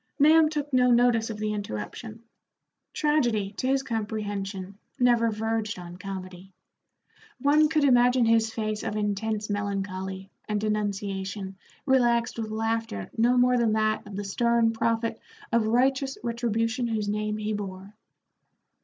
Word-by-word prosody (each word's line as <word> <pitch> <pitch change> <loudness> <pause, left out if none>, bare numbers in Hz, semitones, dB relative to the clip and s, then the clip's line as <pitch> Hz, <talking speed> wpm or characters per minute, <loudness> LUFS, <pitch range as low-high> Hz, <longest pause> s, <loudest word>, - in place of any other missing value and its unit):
Nahum 310 +1 +6
took 295 -2 -4
no 250 -1 +4
notice 240 -2 +3
of 220 - -5
the 215 0 -2
interruption. 210 - -6 0.7
Tragedy, 240 -10 +1
to 255 - -1
his 270 0 +2
comprehension, 205 -4 -4 0.2
never 240 -2 +3
verged 220 -1 -2
on 175 -1 -9
comedy. 190 -1 -8 0.9
One 295 +3 +4
could 310 -1 +2
imagine 245 -2 +4
his 225 -1 +3
face 215 -1 -3
of - - -3
intense 210 +1 -1
melancholy 195 -2 -4 0.2
and 210 -1 0
denunciation 200 -2 -3 0.3
relaxed 240 -4 +2
with 220 -1 -3
laughter 225 - -2
no 240 +2 +3
more 250 0 +4
than 225 -2 +2
that 215 -1 0
of 205 - -8
the 205 - -3
stern 230 +3 +2
prophet 230 0 -1 0.3
of 230 -2 +2
righteous 265 +3 +1
retribution 235 +1 -1
whose 215 -3 -2
name 210 +1 -1
he 215 0 -2
bore. 195 -1 -6
220 Hz, 135 wpm, -26 LUFS, 205-240 Hz, 0.9 s, Nahum